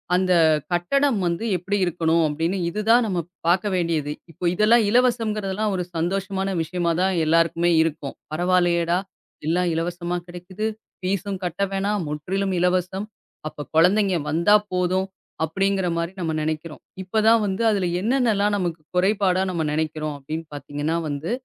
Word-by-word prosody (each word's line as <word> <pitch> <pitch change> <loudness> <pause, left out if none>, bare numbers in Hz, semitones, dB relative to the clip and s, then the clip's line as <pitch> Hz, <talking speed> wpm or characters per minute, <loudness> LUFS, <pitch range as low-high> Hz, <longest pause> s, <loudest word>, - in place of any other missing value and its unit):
அந்தக் 170 -4 +3
கட்டடம் 245 +9 +2
வந்து 170 +5 -1
எப்டி 195 +4 -2
இருக்கணும் 165 -1 +1
அப்டின்னு 165 +6 -1
இது 210 +5 -3
தான் 240 +1 +6
நாம 180 -5 -1 0.2
பாக்க 180 +4 +3
வேண்டியது. 165 -4 0 0.2
இப்போ 170 - -6
இதெல்லாம் 220 +4 +4
இலவசங்கறதெல்லாம் 215 -4 +1
ஒரு 180 - -1
சந்தோஷமான 195 +3 -1
விஷியமா 170 +1 -1
தான் 190 0 +2
எல்லாருக்குமே 165 +2 +2
இருக்கும். 150 -3 -2 0.2
"பரவா 180 +3 +2
இல்லயேடா 170 0 +1 0.5
எல்லாம் 175 +2 +1
இலவசமா 175 +1 -2
கிடைக்குது. 180 +4 -6 0.3
ஃபீஸும் 195 +1 -2
கட்ட 180 +3 -2
வேணாம். 195 0 -1
முற்றிலும் 190 +6 -2
இலவசம். 185 +3 0 0.4
அப்பக் 145 - -10
குழந்தைங்க 190 +1 +4
வந்தா 170 +6 +4 0.2
போதும்" 185 +1 +1 0.4
அப்டிங்கிற 190 +3 0
மாரி 170 +1 -2
நம்ம 160 -3 -1
நெனைக்கிறோம். 155 0 -4 0.2
இப்பதான் 220 +4 +3
வந்து 195 +1 -2
அதுல 195 -4 +1
என்னென்னலாம் 220 -3 +2
நமக்குக் 170 -5 -4
குறைபாடு 190 0 +2
நாம 165 -3 -1
நினைக்கிறோம் 155 -1 -2
அப்டின்னு 155 +4 -6
பாத்தீங்கன்னா 145 +2 -3
வந்து 150 +6 -3
180 Hz, 135 wpm, -23 LUFS, 165-195 Hz, 0.5 s, தான்